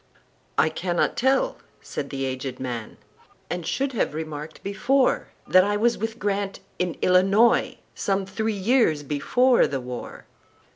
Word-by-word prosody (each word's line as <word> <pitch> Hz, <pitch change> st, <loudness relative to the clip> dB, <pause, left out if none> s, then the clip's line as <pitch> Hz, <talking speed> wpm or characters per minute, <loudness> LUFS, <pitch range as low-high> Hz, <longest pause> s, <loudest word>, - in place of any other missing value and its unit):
"I -, -, +4 dB
cannot 175 Hz, +2 st, -1 dB
tell," 270 Hz, -, +2 dB, 0.2 s
said 140 Hz, -, -6 dB
the 135 Hz, -1 st, -3 dB
aged 130 Hz, 0 st, -4 dB
man,"And 130 Hz, +7 st, -7 dB
should 275 Hz, 0 st, -1 dB
have 205 Hz, -9 st, -1 dB
remarked 155 Hz, -1 st, -6 dB
before, 255 Hz, +7 st, +1 dB, 0.2 s
That 185 Hz, 0 st, +6 dB
I 205 Hz, +1 st, 0 dB
was 235 Hz, +2 st, +2 dB
with 225 Hz, +1 st, -4 dB
Grant,—in 195 Hz, -4 st, -3 dB
Illinois,—Some 195 Hz, 0 st, +2 dB
three 220 Hz, +3 st, -2 dB
years 195 Hz, -, +2 dB
before 240 Hz, -, +3 dB
the 135 Hz, -, -3 dB
war." 125 Hz, -1 st, -7 dB
190 Hz, 125 wpm, -24 LUFS, 150-225 Hz, 0.2 s, That